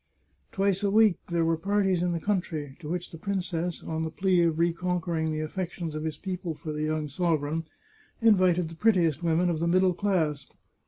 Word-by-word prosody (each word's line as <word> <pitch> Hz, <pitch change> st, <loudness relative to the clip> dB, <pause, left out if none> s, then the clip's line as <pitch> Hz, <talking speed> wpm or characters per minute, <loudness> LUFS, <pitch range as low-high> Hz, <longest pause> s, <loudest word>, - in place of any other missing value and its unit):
Twice 195 Hz, 0 st, +1 dB
a 200 Hz, -, +1 dB
week 215 Hz, -2 st, +4 dB
there 170 Hz, -1 st, +1 dB
were 165 Hz, 0 st, +2 dB
parties 195 Hz, 0 st, +1 dB
in 180 Hz, 0 st, +1 dB
the 170 Hz, -, -1 dB
country, 160 Hz, -7 st, -2 dB
to 155 Hz, -3 st, -8 dB
which 175 Hz, +1 st, -3 dB
the 165 Hz, -, -10 dB
princess, 180 Hz, -3 st, -2 dB
on 160 Hz, 0 st, -3 dB
the 160 Hz, -, -2 dB
plea 185 Hz, +1 st, +2 dB
of 165 Hz, -2 st, +2 dB
reconquering 170 Hz, -1 st, 0 dB
the 155 Hz, 0 st, -2 dB
affec 175 Hz, +3 st, -4 dB
tions 170 Hz, -4 st, -5 dB
of 155 Hz, +1 st, -4 dB
his 160 Hz, -, -3 dB
people 180 Hz, -4 st, -4 dB
for 155 Hz, +1 st, -6 dB
the 150 Hz, -, -3 dB
young 155 Hz, -1 st, -1 dB
sovereign, 160 Hz, 0 st, -1 dB, 0.5 s
invited 185 Hz, -6 st, +4 dB
the 165 Hz, -, -10 dB
pret 220 Hz, +5 st, +3 dB
tiest 165 Hz, -4 st, +1 dB
women 170 Hz, +1 st, +2 dB
of 170 Hz, -3 st, 0 dB
the 170 Hz, -, 0 dB
middle 185 Hz, +1 st, +3 dB
class. 165 Hz, -7 st, 0 dB
170 Hz, 205 wpm, -27 LUFS, 160-185 Hz, 0.5 s, week